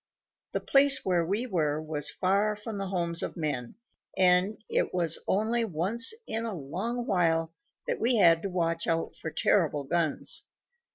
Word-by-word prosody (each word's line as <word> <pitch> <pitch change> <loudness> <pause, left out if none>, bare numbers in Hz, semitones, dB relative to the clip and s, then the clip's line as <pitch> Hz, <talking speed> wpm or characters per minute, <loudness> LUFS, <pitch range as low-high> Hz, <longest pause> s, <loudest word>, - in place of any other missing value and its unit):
The - - 0
place 275 0 +4
where 180 -2 +2
we 200 +8 -1
were 155 -9 0
was 155 -2 -1
far 200 +3 +1
from 210 0 -7
the 195 0 -3
homes 170 -3 -1
of - - -5
men, 145 -7 -3 0.4
and 185 +3 +3
it - - -1
was 170 -3 +2
only 225 +4 +1
once 210 +6 +2
in 225 +1 -3
a 225 -3 -4
long 195 - -4
while 165 -4 +1 0.3
that - - -2
we 240 +2 +2
had 170 -6 +5
to 195 - -3
watch 170 -2 -1
out 165 -1 -1
for 160 - -6
terrible 155 -3 +1
guns. 160 +1 0
180 Hz, 165 wpm, -28 LUFS, 165-210 Hz, 0.4 s, had